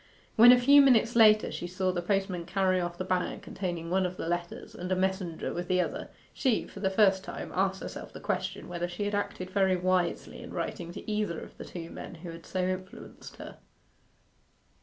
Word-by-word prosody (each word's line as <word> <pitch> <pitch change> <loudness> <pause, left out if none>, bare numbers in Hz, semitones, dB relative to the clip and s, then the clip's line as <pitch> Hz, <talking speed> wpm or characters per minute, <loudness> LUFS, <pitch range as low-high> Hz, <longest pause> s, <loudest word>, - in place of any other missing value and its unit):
When, 235 +2 +9
a 250 - +7
few 285 +3 +7
minutes 240 -4 +4
later, 215 -2 +6
she 175 - -5
saw 185 +1 -1
the 175 -1 -2
postman 190 -2 -1
carry 185 -1 +2
off 175 0 -4
the 185 - -3
bag 185 -1 -1
containing 175 -3 -4
one 190 +1 +2
of 180 0 -3
the - - -4
letters, 175 0 -4
and 180 +1 -6
a - - +3
messenger 185 -3 -1
with 175 0 -4
the 185 0 +2
other, 180 - -2 0.2
she, 255 -6 +1
for - - -11
the 195 -1 +1
first 190 -1 +3
time, - - -7
asked 190 +1 0
herself - - -7
the - - -9
question - - -3
whether 175 0 -3
she 175 +3 -4
had 205 - -2
acted 190 -2 -3
very 190 -1 +3
wisely 180 -1 -1
in - - -9
writing 170 -1 -4
to - - -9
either 210 -6 -1
of - - -11
the - - -9
two 170 -2 -8
men - - -8
who 170 +1 -8
had 165 0 -11
so 185 -1 -1
influenced 185 0 -7
her. - - -10
185 Hz, 210 wpm, -29 LUFS, 175-195 Hz, 0.2 s, When